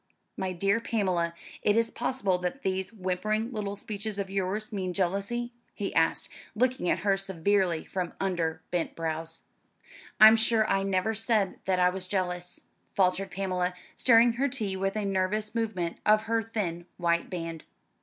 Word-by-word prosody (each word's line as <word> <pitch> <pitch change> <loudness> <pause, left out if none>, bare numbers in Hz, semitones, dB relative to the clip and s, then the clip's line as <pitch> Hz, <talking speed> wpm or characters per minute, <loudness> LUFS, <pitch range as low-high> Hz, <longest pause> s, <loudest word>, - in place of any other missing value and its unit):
"My 190 -1 -2
dear 195 +4 +1
Pamela, 185 -8 0 0.3
is 230 +2 +3
it - - -21
possible 200 -9 0
that 180 +10 -4
these 190 0 -1
whimpering 215 +3 -1
little 205 -3 -3
speeches 210 0 -5
of 195 -1 -3
yours 195 +3 -2
mean 185 -3 -2
jealousy?" 200 +7 -1 0.2
he 200 -2 -3
asked, 165 0 +2 0.3
looking 250 -5 +1
at - - 0
her 195 -1 +4
severely 190 -2 0
from 180 -2 -3
under 165 -4 -1
bent 175 -2 -1
brows. 165 0 -3 0.8
"I'm 220 +1 +10
sure 220 -1 +3
I 195 - +2
never 195 +2 0
said 220 -3 +1
that 185 -1 +1
I 180 0 +4
was 185 0 -2
jealous," 180 -2 -2 0.3
faltered 190 0 +2
Pamela, 185 -1 -1 0.2
stirring 235 -1 +5
her 265 +4 +1
tea 215 -7 -2
with 195 +1 -1
a 215 -1 -1
nervous 200 +3 0
movement 210 -7 -2
of 215 0 +4
her 225 0 +1
thin 185 -7 -3
white 170 -1 +1
band. 165 -3 -5
195 Hz, 160 wpm, -28 LUFS, 180-215 Hz, 0.8 s, I'm